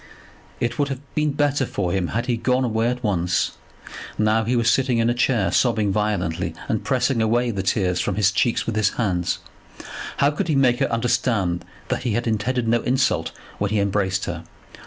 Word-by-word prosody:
It 120 +2 -2
would 145 - +2
have 135 -2 -4
been 150 -1 +1
better 145 -1 +1
for 100 -7 -2
him 90 -1 0
had 115 +6 -2
he 125 -2 +1
gone 125 +3 +1
away 115 -1 +1
at 125 0 -2
once. 95 -3 +1 0.7
Now 110 +1 +2
he 125 +3 +1
was 115 -1 +1
sitting 130 0 +3
in 115 +1 +2
a - - +1
chair, 120 -6 +1
sobbing 110 -4 +2
violently, 100 -5 -1
and - - -1
pressing 125 -4 +1
away 120 +2 +2
the 100 -3 -2
tears 95 -2 0
from 100 - -1
his 100 -1 +3
cheeks 115 +4 +1
with 115 - -2
his 110 -1 +2
hands. 90 -7 0 0.8
How 140 +1 +3
could 150 - -2
he 155 - +1
make 130 -2 +3
her 140 - +1
understand 115 -6 0 0.3
that - - -1
he 120 -4 -1
had 120 +2 -1
intended 115 +2 0
no 115 +1 +2
insult 130 +2 +1 0.3
when 100 - 0
he 105 0 +1
embraced 95 -1 0
her? 85 -1 -5
115 Hz, 200 wpm, -22 LUFS, 100-125 Hz, 0.8 s, sitting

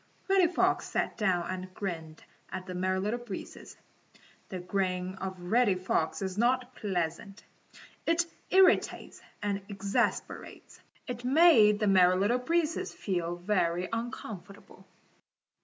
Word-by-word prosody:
Reddy 385 -2 +5
Fox 355 - +1
sat - - -1
down 185 -6 +1
and 185 0 -5
grinned 165 -6 -5 0.3
at 185 - -5
the 185 - -6
Merry 185 +1 0
Little 210 +5 -1
Breezes. 240 -5 -9 0.7
The 185 - -5
grin 185 0 -2
of 190 -1 -5
Reddy 205 +3 +2
Fox 180 -1 -1
is 190 +1 -3
not 250 +1 +1
pleasant. 190 -1 -3 0.6
It 335 +1 +3 0.2
irritates 380 0 +3 0.2
and 200 -1 -1
exasperates. 200 0 -3 0.2
It 245 -2 -6
made 255 -7 +6
the 215 - +1
Merry 185 -2 +5
Little 205 +7 +2
Breezes 330 +4 0
feel 175 -3 -2
very 175 -1 0
uncomfortable. 220 -4 -7
195 Hz, 125 wpm, -30 LUFS, 185-240 Hz, 0.7 s, made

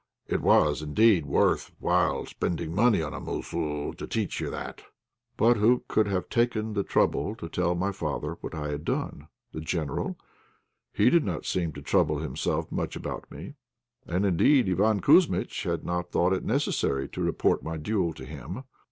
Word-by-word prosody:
It - - -1
was, 75 0 +4
indeed, 85 +1 +3
worth 70 - +2
while - - +1
spending 85 -1 -3
money 110 -1 +4
upon 75 -2 -4
a - - -5
'mossoo' 75 -3 -3
to - - -8
teach - - -2
you - - -2
that." - - -6 0.6
But 120 +1 +4
who 115 +4 +3
could 110 -1 +2
have 95 -2 -1
taken 115 -2 0
the 100 - +1
trouble 105 - +1
to 85 - -7
tell 90 +1 0
my 95 +3 0
father 80 -7 -4
what - - -6
I 75 -1 -3
had 75 +1 -4
done. 75 -2 -3 0.2
The 80 - -6
General? 80 -2 -2 0.7
He 125 - +3
did 170 -3 +4
not 90 -6 -3
seem 85 -4 -1
to 70 - -9
trouble 75 -2 +2
himself 80 +1 -2
much - - -3
about - - -6
me; 80 - -8 0.5
and, 90 +4 0
indeed, 120 - +4
Iván 100 +3 +2
Kouzmitch - - +3
had - - -1
not 90 0 -2
thought 90 +2 +2
it 95 - -1
necessary 105 - 0
to - - -6
report - - +1
my 80 0 -4
duel 90 +1 0
to 65 - -9
him. 75 - -7
90 Hz, 180 wpm, -27 LUFS, 75-105 Hz, 0.7 s, was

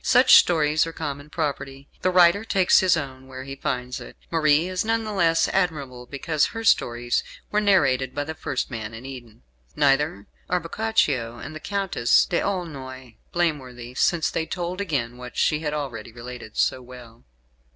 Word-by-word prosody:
Such 255 +1 +5
stories 155 -2 +5
are - - -5
common 145 -2 -5
property. 140 -3 -4
The 185 - +2
writer 180 +2 +5
takes 195 -5 +4
his 185 -2 +3
own 130 -3 -6
where 130 0 -8
he 135 +1 -7
finds 125 -2 -3
it. - - -11
Marie 155 0 +3
is 185 0 -1
none 225 +1 0
the 215 -1 -5
less 165 -4 +3
admirable 140 -9 -2
because 145 +2 0
her 225 +2 -6
stories 120 - +2 0.3
were 210 - +2
narrated 135 -11 +2
by 145 - -1
the 160 +2 -5
first 155 - -3
man 110 -1 -5
in 115 +3 -10
Eden; 120 - -10 0.3
neither 140 -6 +2 0.2
are 180 - +2
Boccaccio 150 - 0
and 155 - -8
the - - -6
Countess 195 -11 +2
D'Aulnoy 135 - -4
blameworthy 130 -8 -2
since 165 +5 +1
they 160 -1 -2
told 180 +1 -3
again 130 -10 -2
what 125 -1 -10
she 155 +1 +1
already 135 -7 -4
had 115 - -19
related 120 -2 -9
so 130 - +1
well. 125 -2 -13
145 Hz, 170 wpm, -24 LUFS, 125-175 Hz, 0.3 s, Such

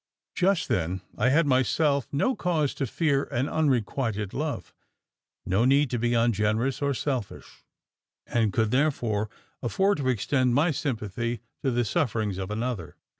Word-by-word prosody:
Just 190 -1 +2
then, 90 - -1
I 125 - +2
had 155 +4 +4
myself 140 0 +2
no 200 - +1
cause 160 -6 0
to 135 - -2
fear 140 +1 +1
an 125 +4 -1
unrequited 120 -8 0
love 150 0 -3 0.7
no 95 +5 +2
need 140 +1 +3
to 120 - -1
be 120 +1 +1
ungenerous 115 +3 +1
or 140 -1 +1
selfish 130 -6 -4 0.6
and 115 -3 +1
could, 110 +2 +1
therefore, 120 -7 +1 0.3
afford 195 - +1
to 130 -2 0
extend 125 +1 +1
my 160 +5 +3
sympathy 115 - -3 0.2
to 135 - +1
the 120 -1 +1
sufferings 110 - -1
of 95 - -4
another. 110 -5 -3
125 Hz, 145 wpm, -27 LUFS, 110-145 Hz, 0.7 s, had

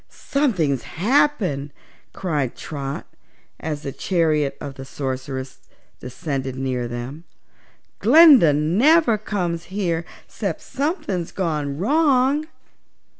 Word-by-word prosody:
"Something's 180 - 0
happened!" 195 - +1 0.4
cried 150 -9 -2
Trot, 140 -2 -5 0.5
as 150 -1 -4
the 140 - -4
chariot 155 -5 0
of 140 - -6
the 135 - -9
Sorceress 130 -1 -5 0.4
descended 135 -1 -4
near 130 -2 -2
them. 120 +6 -6 0.8
"Glinda 275 - +7
never 220 - +3
comes 175 -6 -3
here 175 -3 -2 0.2
'cept - - -4
something's 265 - -3
gone 150 -6 -2
wrong." 280 - +2
165 Hz, 95 wpm, -22 LUFS, 140-225 Hz, 0.8 s, Glinda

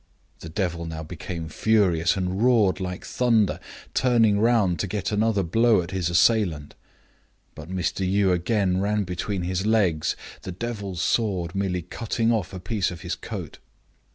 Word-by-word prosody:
The 80 - -8
devil 85 -1 -2
now 80 -1 -5
became 85 0 -6
furious, 95 -3 +2
and 95 +1 -2
roared 115 -6 +3
like 90 -1 -5
thunder, 115 -5 +2 0.3
turning 115 -5 +3
round 110 -6 +2
to 100 - -1
get 100 +1 -3
another 105 -1 +1
blow 110 +3 +3
at 85 - -9
his 90 -3 -1
assailant. 85 -5 +2 0.8
But 80 +1 -10
Mr. 95 +1 -2
Yii 95 +1 +2
again 95 0 +1
ran 105 +1 +1
between 90 +1 -3
his 90 +1 -1
legs, 95 -9 +2 0.3
the 95 - -6
devil's 100 -3 -4
sword 95 -7 0
merely 95 -3 -1
cutting 115 +5 -1
off 105 -6 -1
a 95 - -6
piece 95 +1 -1
of 90 - -8
his - - -3
coat. - - -7
95 Hz, 155 wpm, -25 LUFS, 90-110 Hz, 0.8 s, roared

